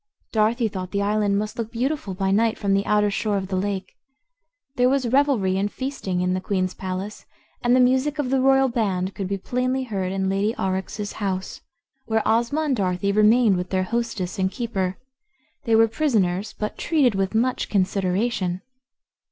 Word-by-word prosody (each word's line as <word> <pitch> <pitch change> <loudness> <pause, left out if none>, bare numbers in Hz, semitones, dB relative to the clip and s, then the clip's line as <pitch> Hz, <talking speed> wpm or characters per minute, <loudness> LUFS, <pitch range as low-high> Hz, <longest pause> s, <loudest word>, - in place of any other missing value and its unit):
Dorothy 225 +2 +2
thought 185 -3 -5
the 200 +1 -1
island 205 -1 +1
must 215 +2 -3
look 225 -1 -3
beautiful 245 -4 -2
by 190 0 0
night 220 +2 +2
from 200 -2 0
the 195 +1 +1
outer 210 -1 +3
shore 210 0 0
of 190 -1 -4
the 190 - -1
lake. 190 0 -2 0.8
There 250 0 +3
was 265 -2 +1
revelry 235 -8 +2
and 205 +1 -1
feasting 260 -9 -3
in 180 0 +1
the 185 - -1
Queen's 185 -2 -1
palace, 190 +2 -6 0.3
and 245 +1 +3
the - - +4
music 260 +4 +2
of 275 -4 -1
the 270 -1 +2
royal 270 0 +4
band 195 -6 -1
could 195 - -4
be 200 +1 -2
plainly 255 +5 -1
heard 195 -6 -3
in 190 0 -1
Lady 200 +3 0
Aurex's 190 +2 -3
house, 190 -3 -4 0.5
where 220 -1 +1
Ozma 235 +7 +2
and 295 -4 +1
Dorothy 190 -1 0
remained 215 0 +4
with 180 0 -4
their 185 -1 +1
hostess 220 -3 -3
and 190 0 +2
keeper. 195 -6 -2 0.7
They 230 -2 +3
were 225 0 +6
prisoners, 215 - 0
but 210 - -4
treated 285 -8 +2
with 195 +2 -1
much 250 +3 0
consideration. 190 0 0
210 Hz, 180 wpm, -23 LUFS, 190-240 Hz, 0.8 s, were